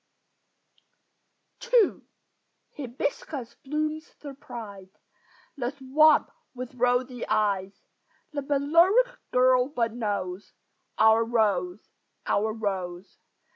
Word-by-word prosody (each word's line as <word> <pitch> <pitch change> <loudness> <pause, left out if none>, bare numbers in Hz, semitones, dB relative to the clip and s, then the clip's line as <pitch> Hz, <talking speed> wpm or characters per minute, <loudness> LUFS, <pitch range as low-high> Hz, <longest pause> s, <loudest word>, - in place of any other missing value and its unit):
II 470 -6 +4 0.7
Hibiscus 260 -1 -4
blooms 305 +2 -2
surprise 230 -9 -9 0.7
The 245 -4 -2
swamp 290 +3 +4 0.2
with 255 +1 -7
rosy 245 0 0
eyes; 200 -2 -1 0.5
The 285 - -2
Balearic 335 - +3
girl 255 0 +4
but 230 -5 -1
knows 205 -5 -4 0.4
Our 220 +1 +5
rose, 205 -5 0 0.3
our 215 +2 +1
rose! 190 -4 -5
245 Hz, 80 wpm, -26 LUFS, 210-285 Hz, 0.7 s, Our